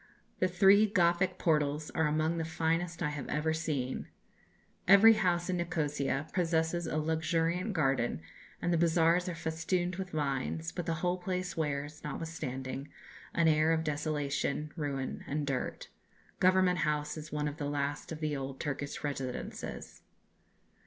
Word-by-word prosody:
The 185 - +3
three 195 +4 +6
Gothic 180 -1 +2
portals 150 -2 +1
are 160 -1 +1
among 155 +2 +1
the - - 0
finest 165 +2 -1
I 150 - +1
have 145 -2 -5
ever 160 +1 0
seen. 150 -5 -2 0.8
Every 200 +4 +9
house 180 -5 +1
in 185 -1 0
Nikosia 150 -5 -1
possesses 170 -1 +1
a 155 - -1
luxuriant 165 +5 0
garden, 135 - +1 0.4
and 175 - +2
the 165 - +2
bazaars 170 +2 +3
are 175 - -4
festooned 170 +2 -1
with 190 -1 -4
vines; 135 - -2
but 175 - -5
the 165 - +1
whole 180 +1 +1
place 180 -1 -3
wears, 150 -1 -3
notwithstanding, 135 -4 -4 0.5
an 170 -1 +4
air 155 0 +4
of 160 0 +2
desolation, 150 -1 -1
ruin, 140 -5 -3
and 145 +1 -1
dirt. 135 -3 -3 0.5
Government 185 -1 +4
House 150 -1 0
is 155 -1 -8
one 150 0 -1
of 145 +1 -5
the 145 -2 -2
last 145 +1 -2
of 160 0 -6
the 150 -1 0
old 135 -1 -5
Turkish 145 0 -4
residences. 135 -3 -5
160 Hz, 150 wpm, -32 LUFS, 145-175 Hz, 0.8 s, Every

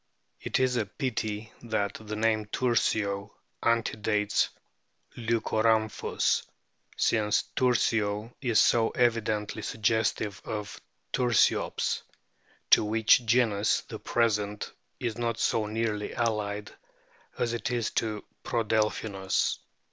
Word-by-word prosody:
It - - -1
is 130 -1 +2
a 110 -4 0
pity 110 -3 -3
that 105 -4 -1
the 110 0 -5
name 110 -1 +1
Tursio 105 -4 0 0.3
antedates 110 -2 +1 0.7
Leuco 115 -1 0
rhamphus, 110 -1 +2 0.6
since 105 -2 +2
Tursio 115 -3 +1
is 120 -5 +3
so 115 -1 +4
evidently 110 -3 0
suggestive 110 -2 0
of 105 -2 -5 0.3
Tursiops, 120 -3 +2 0.7
to - - +8
which 110 +2 +3
genus 110 -3 +3
the - - -9
present 105 -3 0 0.3
is 120 -2 -3
not 115 -1 -1
so 110 -2 +1
nearly 105 -1 -2
allied 105 -3 -1 0.7
as 120 -1 0
it 115 -2 -2
is 120 -3 -1
to 110 -2 -2 0.2
Prodelphinus. 110 -4 0
110 Hz, 100 wpm, -28 LUFS, 105-115 Hz, 0.7 s, to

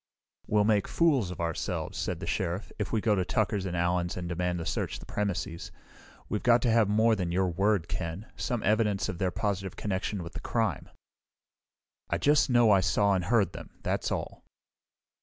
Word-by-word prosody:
"We'll 105 0 +3
make 105 -2 +2
fools 140 - +2
of 90 - -7
ourselves," 85 0 -3
said - - -3
the - - -4
Sheriff, 90 +2 -2
"if 105 - -2
we 110 - +1
go 110 -1 +2
to 95 -3 +1
Tucker's 100 0 0
and 90 -1 -3
Allen's, 85 0 0
and 90 -1 -4
demand 90 +1 -1
to 85 - -4
search - - -2
the - - -11
premises. 90 -5 -3 0.6
We've 105 - -2
got 120 -1 +4
to 120 - +3
have 110 -3 +4
more 110 +2 +4
than 90 -4 -2
your 95 +2 +2
word, 95 0 +1
Ken; 85 +4 -4
some 120 -3 -2
evidence 105 -2 +1
of 90 - -5
their 95 - +1
positive 95 -1 -2
connection 95 -1 -2
with 85 - -9
the - - -5
crime." - - -1 1.2
"I - - +1
just 145 -1 +3
know 120 -3 +5
I 100 - +6
saw 100 +4 +2
and 90 -2 0
heard 100 -4 +2
them. - - -10
That's - - -1
all." - - -4
95 Hz, 195 wpm, -29 LUFS, 90-110 Hz, 1.2 s, I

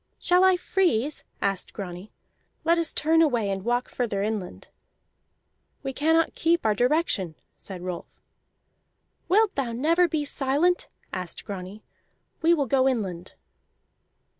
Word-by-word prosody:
"Shall 360 0 +3
I 375 -1 +5
freeze?" 310 - +1 0.2
asked 195 -2 -1
Grani. 185 0 -7 0.5
"Let 335 +1 +3
us 330 -2 0
turn 325 +2 +3
away 240 -10 +2
and 195 -1 -3
walk 245 +2 0
further 210 -5 -2
inland." 210 -4 -4 1.1
"We 270 -1 -3
cannot 320 +4 +2
keep 335 -3 +1
our 215 - +4
direction," 245 - +1 0.2
said 185 -3 -9
Rolf. 180 -2 -5 1.2
"Wilt 420 +2 +4
thou 255 -4 -2
never 330 +8 +3
be 310 -2 -1
silent?" 290 +6 +1 0.3
asked 180 -2 -5
Grani. 195 +1 -7 0.6
"We 330 - +4
will 300 -5 +3
go 265 +1 +3
inland." 190 -8 -4
260 Hz, 130 wpm, -26 LUFS, 200-330 Hz, 1.2 s, I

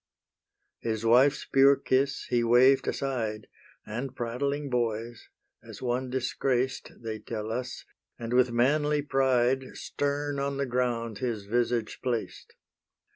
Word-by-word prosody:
His 110 -1 -3
wife's 130 +5 +4
pure 135 +1 +5
kiss 135 +1 0
he 120 -1 +3
waved 130 +3 +5
aside, 115 -6 -2 0.4
And 125 +4 -5
prattling 140 +5 -2
boys, 115 -1 -2 0.3
as - - -11
one 125 +1 -2
disgraced, 130 0 -1
They 110 -1 -4
tell 110 0 -5
us, 125 +2 -4 0.3
and 115 0 -5
with 125 0 +4
manly 145 +5 +2
pride 130 -2 +1
Stern 145 0 -2
on 140 0 -2
the 140 - 0
ground 120 -3 -1
his 115 -5 -3
visage 120 +1 -1
placed. 120 -3 -4
125 Hz, 125 wpm, -28 LUFS, 115-135 Hz, 0.4 s, pure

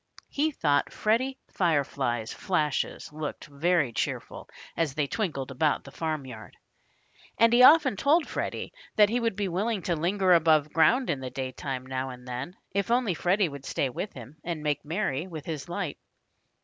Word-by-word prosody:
He 300 +2 +1
thought 145 - +1
Freddie 255 +5 0
Firefly's 140 - 0
flashes 155 -5 -1
looked 155 -1 -5
very 150 -2 +1
cheerful - - -4 0.3
as 155 -5 -1
they 150 - +1
twinkled 140 - -3
about 150 +3 +1
the 140 - -12
farmyard. 140 -7 -5 0.8
And 230 +1 +5
he 245 - +6
often 290 -5 +7
told 310 - +3
Freddie - - -4 0.2
that 210 -1 +6
he 240 +3 +1
would 230 -4 0
be 205 -1 -1
willing 195 +3 -1
to 175 - 0
linger 185 +3 +2
above 155 -3 +4
ground 245 +11 +4
in 140 - -2
the 130 -1 -5
daytime 130 0 -4
now 130 0 -3
and 125 0 -10
then, 125 +8 -5 0.2
if 200 +1 -1
only 240 -5 +2
Freddie 180 +3 +2
would 140 -1 -9
stay 135 - -1
with 190 +11 -5
him 130 +4 -11
and 165 -3 -4
make 145 -1 0
merry 165 -1 -2
with 160 -4 -8
his 160 0 -5
light. 175 -4 -3
160 Hz, 170 wpm, -28 LUFS, 140-200 Hz, 0.8 s, often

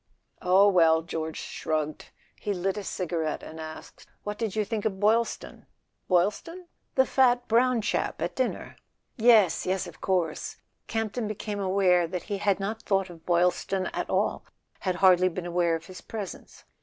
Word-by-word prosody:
"Oh, 190 +2 +5
well," 165 -4 +4
George 160 -1 -4
shrugged. 155 -1 -3 0.3
He 205 -1 -3
lit 185 +2 -1
a 205 - -5
cigarette, 165 -4 -3
and 160 - -9
asked: 155 0 -10 0.2
"What 210 0 -5
did 220 -3 -2
you 215 -1 +1
think 215 -1 -3
of 195 -3 -2
Boylston?" 225 +3 0 0.2
" - - -50
Boylston? 210 - 0
" - - -48
"The 265 - +5
fat 245 -2 +3
brown 240 0 +3
chap - - -1
at - - -2
dinner." - - -2 0.4
"Yes—yes—of 190 -6 +3
course." 175 -5 -1 0.3
Campton 225 0 -2
became 210 0 -4
aware 185 -3 +3
that 180 +1 -4
he 200 -2 -4
had 200 -1 +1
not 210 +3 -3
thought 195 -2 0
of 165 -2 -15
Boylston 180 +2 +1
at - - -3
all, - - 0 0.4
had 185 -2 -1
hardly 185 0 +6
been 180 0 -6
aware 175 -1 +1
of 165 0 -7
his 185 +1 -10
presence. 210 -4 -8
190 Hz, 165 wpm, -27 LUFS, 175-215 Hz, 0.4 s, hardly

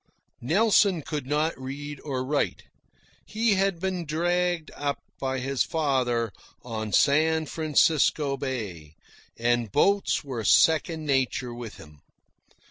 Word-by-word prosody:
Nelson 195 - +3
could 150 -3 -5
not 150 +3 0
read 145 +2 -6
or 130 -3 -3
write. 145 +2 -1 0.6
He 220 0 +1
had 195 -2 +1
been 185 -1 -2
"dragged" 175 +1 0
up 145 -1 -2 0.2
by 130 -1 -2
his 135 +1 -2
father 125 -7 0 0.3
on 110 -3 -5
San 155 +5 +3
Francisco 150 -2 +2
Bay, 105 - -5 0.4
and 120 -2 0
boats 200 +5 +2
were 130 -6 -5
second 160 +6 +3
nature 130 -3 0
with 120 -2 -8
him. 75 -1 -15
145 Hz, 120 wpm, -26 LUFS, 125-160 Hz, 0.6 s, Nelson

